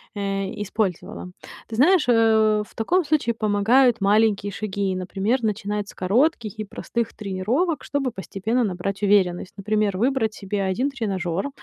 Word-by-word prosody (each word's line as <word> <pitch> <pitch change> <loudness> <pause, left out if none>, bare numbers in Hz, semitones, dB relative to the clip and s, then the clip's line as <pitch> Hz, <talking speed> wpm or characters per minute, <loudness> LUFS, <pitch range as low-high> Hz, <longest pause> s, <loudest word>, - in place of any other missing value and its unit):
э, 195 -1 -2
использовала. 190 -3 -3 0.4
Ты 225 - -5
знаешь, 345 +7 +5
э, 220 -2 +4
в - - -22
таком 350 +11 +1
случае 290 -6 +1
помогают 225 +3 +3
маленькие 205 0 +2
шаги. 200 -1 -2
Например, 195 +7 -1
начинать 210 -1 -2
с - - -11
коротких 225 - 0
и 215 - -3
простых 230 +3 -4
тренировок, 220 - -1
чтобы 275 -3 -1
постепенно 215 +4 -2
набрать 195 +1 -3
уверенность. 190 -3 +2
Например, 210 -1 0
выбрать 235 -1 +1
себе 200 -1 -3
1 195 +9 0
тренажёр, 195 -4 -2
210 Hz, 140 wpm, -23 LUFS, 195-235 Hz, 0.4 s, знаешь